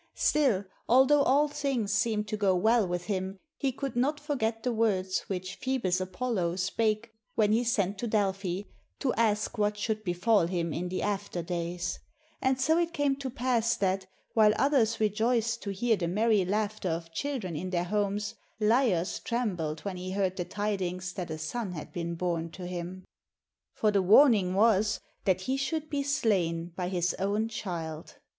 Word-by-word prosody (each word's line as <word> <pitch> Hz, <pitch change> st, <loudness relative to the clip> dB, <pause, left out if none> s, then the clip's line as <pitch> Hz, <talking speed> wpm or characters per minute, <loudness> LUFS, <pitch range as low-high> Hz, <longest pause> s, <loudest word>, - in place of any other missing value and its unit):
Still, 245 Hz, -10 st, +2 dB, 0.2 s
although 265 Hz, +4 st, +6 dB
all 280 Hz, +2 st, +4 dB
things 275 Hz, -8 st, -1 dB
seemed 210 Hz, 0 st, +1 dB
to -, -, -1 dB
go 200 Hz, -3 st, +2 dB
well 220 Hz, +3 st, +3 dB
with 175 Hz, 0 st, -3 dB
him, 190 Hz, -1 st, -2 dB, 0.2 s
he 275 Hz, -2 st, 0 dB
could 270 Hz, 0 st, -5 dB
not 285 Hz, +5 st, +1 dB
forget 235 Hz, -7 st, -2 dB
the 250 Hz, -, 0 dB
words 190 Hz, -4 st, +1 dB
which 185 Hz, -1 st, -4 dB
Phoebus 230 Hz, -9 st, 0 dB
Apollo 185 Hz, -2 st, -1 dB
spake 215 Hz, +4 st, 0 dB, 0.2 s
when 210 Hz, -1 st, +3 dB
he 230 Hz, +3 st, +3 dB
sent 200 Hz, -4 st, 0 dB
to 240 Hz, -, -2 dB
Del 205 Hz, -3 st, +2 dB
phi 190 Hz, 0 st, -4 dB, 0.3 s
to 265 Hz, -4 st, 0 dB
ask 215 Hz, 0 st, 0 dB
what 210 Hz, 0 st, +1 dB
should 215 Hz, +1 st, -2 dB
befall 180 Hz, +1 st, +2 dB
him 170 Hz, -3 st, -2 dB
in 180 Hz, +2 st, -3 dB
the 185 Hz, -, -2 dB
after 200 Hz, -4 st, -2 dB
days; 175 Hz, 0 st, -3 dB, 0.4 s
and 260 Hz, 0 st, +2 dB
so 315 Hz, +5 st, +3 dB
it 340 Hz, 0 st, 0 dB
came 285 Hz, -3 st, +1 dB
to 275 Hz, -1 st, -4 dB
pass 240 Hz, -2 st, +1 dB
that, 190 Hz, -1 st, 0 dB, 0.3 s
while 215 Hz, -2 st, +5 dB
others 235 Hz, -4 st, +2 dB
rejoiced 225 Hz, +2 st, +1 dB
to 200 Hz, -, -5 dB
hear 225 Hz, +4 st, +1 dB
the 175 Hz, -4 st, -2 dB
merry 210 Hz, +2 st, +3 dB
laughter 210 Hz, 0 st, -1 dB
of 165 Hz, 0 st, -4 dB
children 230 Hz, -, -3 dB
in 180 Hz, +5 st, -3 dB
their 175 Hz, -1 st, 0 dB
homes, 205 Hz, +2 st, -1 dB, 0.3 s
Laios 215 Hz, -5 st, +2 dB
trembled 180 Hz, -11 st, -2 dB
when 195 Hz, -3 st, -4 dB
he 185 Hz, +1 st, -5 dB
heard 190 Hz, -2 st, 0 dB
the 180 Hz, -, -3 dB
tidings 185 Hz, -3 st, -2 dB
that 180 Hz, -3 st, -5 dB
a 155 Hz, -, -4 dB
son 190 Hz, +5 st, -4 dB
had 155 Hz, -, -8 dB
been 170 Hz, -1 st, -3 dB
bom 170 Hz, -1 st, -2 dB
to 180 Hz, +2 st, -8 dB
him. 180 Hz, +1 st, -6 dB, 0.7 s
For 215 Hz, -, +2 dB
the 200 Hz, -1 st, +3 dB
warning 200 Hz, -2 st, +6 dB
was 210 Hz, 0 st, +3 dB, 0.3 s
that 185 Hz, -2 st, +2 dB
he 260 Hz, +8 st, -1 dB
should 305 Hz, +3 st, -2 dB
be 285 Hz, -1 st, 0 dB
slain 180 Hz, -, 0 dB
by 180 Hz, -1 st, -2 dB
his 180 Hz, -1 st, 0 dB
own 205 Hz, +3 st, 0 dB
child. 165 Hz, -7 st, -5 dB
205 Hz, 180 wpm, -29 LUFS, 180-235 Hz, 0.7 s, although